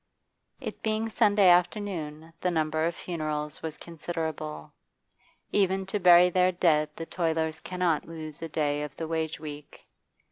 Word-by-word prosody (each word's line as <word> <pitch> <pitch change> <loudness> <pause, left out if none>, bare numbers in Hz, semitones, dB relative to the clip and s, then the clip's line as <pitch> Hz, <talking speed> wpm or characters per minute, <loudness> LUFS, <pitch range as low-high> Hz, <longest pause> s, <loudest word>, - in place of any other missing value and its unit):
It 230 -6 -7
being 220 +1 0
Sunday 210 -3 +4
afternoon 175 -4 +1
the 180 - +1
number 160 -1 +1
of 170 - -3
funerals 155 -3 -4
was 160 -1 -5
considerable; 160 - -5 0.8
even 190 -1 +2
to 200 +2 -2
bury 180 -1 +7
their 185 +1 +4
dead 155 -4 +2
the 165 - -5
toilers 160 -2 -1
cannot 180 -4 -1
lose 160 -1 -8
a 165 - -4
day 145 -1 0
of 150 -2 -6
the 165 - -4
wage 160 -1 -2
week. 150 -1 -9
165 Hz, 145 wpm, -28 LUFS, 155-180 Hz, 0.8 s, bury